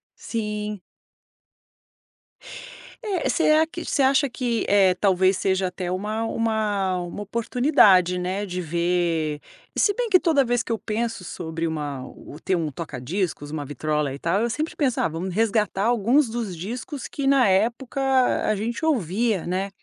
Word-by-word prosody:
Sim. 210 -2 -4 2.2
É, 400 -8 -1
será 315 -1 +4
que 335 +2 -8
você - - 0
acha 275 +1 +3
que, 240 -2 -2
eh, 195 -2 +5
talvez, 190 0 +3
seja 190 -1 +1
até 180 0 -5
uma 210 +4 -2
uma 215 -5 0
uma 175 +3 -6
oportunidade, 205 - +3
né, 185 +3 -2
de 180 -2 -4
ver 170 -2 0 0.3
e - - -3
se 410 - +4
bem 480 +2 -2
que 370 -3 +6
toda 315 -6 +3
vez 245 -1 0
que - - -10
eu 225 - +1
penso 225 -1 -3
sobre 165 -2 -4
uma 145 -5 -4
ou 145 - -12
ter 190 - 0
um 160 -3 -1
toca 145 -3 -7
discos, 155 +1 -3
uma 150 -2 -4
vitrola 150 0 -2
e 140 - -8
tal, 180 +5 0
eu 235 - 0
sempre 305 +7 -3
penso: 270 -5 0
"Ah, - - +2
vamos 170 +3 -4
resgatar 210 -2 +1
alguns 240 +4 +3
dos 225 -4 -3
discos 245 - -6
que 280 - -4
na 270 -4 +4
época 235 +8 0 0.5
a - - +3
gente 230 +8 -3
ouvia, 220 - 0
né". 190 +2 -1
205 Hz, 165 wpm, -24 LUFS, 175-240 Hz, 2.2 s, que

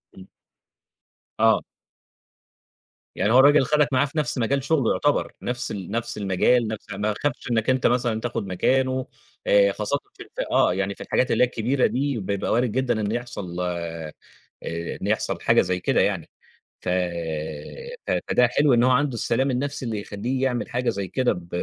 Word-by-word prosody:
إمم. 95 0 -13 1.1
آه. - - +4 1.5
يعني 105 - +1
هو 130 - +7
الراجل 145 0 +6
خدَك 150 -2 +2
معاه 130 +3 +4
في 145 +3 -7
نَفْس 135 -5 0
مجال 135 +3 0
شُغله 140 -5 +2
يُعتبَر، 145 - +1
نفْس 125 0 -3
ال 100 -2 -6
نفْس 115 -1 -3
المجال 105 +4 +2
نفْس 110 -1 -6
ما 105 +2 -1
خافش 130 -3 -2
إنَّك 115 +1 +1
أنت 130 -1 +3
مثلًا 120 -2 +1
تاخد 115 -4 -3
مكانه 130 +7 +1 0.4
آآ 100 -1 +5
خاصةً 105 +8 -1 0.2
في - - -10
ال - - -21
في - - -2
آه - - +4
يعني 100 +1 -2
في - - -12
الحاجات 130 - +1
اللي - - +4
هي - - +4
الكبيرة 125 +3 0
دي 140 -1 -1
بيبقى 100 0 -2
وارد 120 -1 +2
جدًا 120 -3 0
إن 105 +1 -1
يحصَل 110 -7 -5
آآ 85 -3 -4 0.9
إن - - -3
يحصَل - - 0
حاجة - - +4
زي 90 0 -1
كده - - +2
يعني، - - -1 0.5
ف - - -4 1.2
ف - - 0 0.2
فده 125 -1 +4
حلو 140 +2 +3
إن 120 0 +4
هو 130 - +4
عَنده 140 0 +2
السلام 130 +4 +1
النَفْسي 135 +1 -2
اللي 110 -3 -2
يخلّيه 120 +7 -3
يعمل 125 -2 -1
حاجة 125 0 -1
زي 100 -3 -3
كده 130 +3 +1
ب 85 -1 -10
120 Hz, 180 wpm, -24 LUFS, 100-130 Hz, 1.5 s, هو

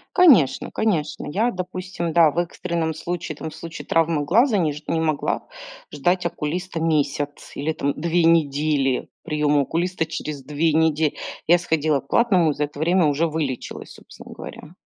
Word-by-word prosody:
Конечно, 270 - +5
конечно. 170 -9 -1
Я, 220 +10 0
допустим, 180 -2 -4
да, 160 -2 +5
в - - -12
экстренном 170 -2 -2
случае, 165 -1 -5
там, 160 - -5
в 155 - -12
случае 160 0 -8
травмы 165 -2 +1
глаза, 225 - +3
не 160 -6 +1
ж 150 - -10
не 165 - 0
могла 155 -3 -1 0.4
ждать 180 0 0
окулиста 170 +1 -3
месяц 145 -2 -1
или 150 +3 -1
там 140 -2 -1
2 170 +2 +1
недели. 145 -4 +2 0.2
Приём 150 -3 +1
окулиста 170 +3 -1
через 150 -3 -5
2 150 +3 0
неде 160 -1 +2 0.3
Я 175 +2 +6
сходила 155 -4 +1
к - - -28
платному 185 -8 +3
и - - -2
за 150 - -1
это 145 0 -12
время 170 +2 +3
уже 150 +3 +2
вылечилась, 150 -5 -4
собственно - - -13
говоря. 155 +3 -10
160 Hz, 165 wpm, -22 LUFS, 150-175 Hz, 0.4 s, Я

